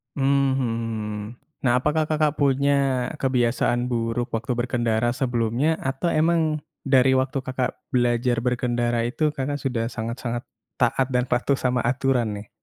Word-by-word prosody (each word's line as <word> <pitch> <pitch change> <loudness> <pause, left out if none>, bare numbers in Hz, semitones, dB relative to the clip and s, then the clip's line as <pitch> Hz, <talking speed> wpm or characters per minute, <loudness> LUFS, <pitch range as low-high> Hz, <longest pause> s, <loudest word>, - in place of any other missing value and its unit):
Mhm, 140 0 +2
hmm. 115 -3 -2 0.4
Nah, 120 -2 +3
apakah 150 +4 +1
Kakak 155 -1 +1
punya 140 -2 +2
kebiasaan 125 -2 +1
buruk 120 0 -1
waktu 115 +3 -3
berkendara 120 -1 0
sebelumnya 125 +4 0
atau 135 +6 -1
memang 160 -1 +2 0.2
dari 130 -1 +4
waktu 130 +1 0
Kakak 130 -1 -3
belajar 120 -1 +1
berkendara 120 -1 0
itu 150 +4 0
Kakak 145 0 -3
sudah 120 -4 -1
sangat-sangat 120 +1 -4 0.3
taat 130 +1 +1
dan 125 0 +3
patuh 125 +3 +2
sama 125 -1 0
aturan 125 -3 +1
nih? 105 - -14
125 Hz, 135 wpm, -24 LUFS, 120-135 Hz, 0.4 s, dari